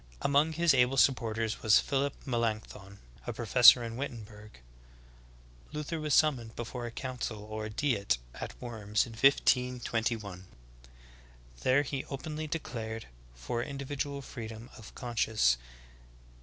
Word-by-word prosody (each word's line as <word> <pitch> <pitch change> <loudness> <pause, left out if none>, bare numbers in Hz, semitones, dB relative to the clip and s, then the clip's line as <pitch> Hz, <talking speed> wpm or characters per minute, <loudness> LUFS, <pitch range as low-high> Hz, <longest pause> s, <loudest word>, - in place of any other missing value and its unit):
Among 145 +3 +3
his 170 -1 +3
able 125 +1 +3
supporters 115 -4 +2
was 110 0 +6
Phillip 140 0 -1
Melancthon, 110 -5 -3 0.3
a - - -2
professor 120 +1 +7
in 115 0 -5
Wittenberg. 105 - -8 1.1
Luther 150 +2 -3
,vas 150 -2 +1
sum 155 -3 +4
moned 115 -1 -11
before 120 +1 -5
a - - -7
council 120 -4 -5
or 110 0 -5
''Diet*' 105 - 0 0.2
at - - -8
Worms 105 -3 -1
in 120 - -10
1521, 115 -6 +1 1.1
There 130 +3 +3
he 135 -1 -4
openly 155 +3 -5
declared 115 - -5 0.3
for 65 - -3
individual 140 +1 -4
freedom 115 -2 -8
of 110 - -13
conscience. 110 - +1
120 Hz, 120 wpm, -31 LUFS, 110-140 Hz, 1.1 s, professor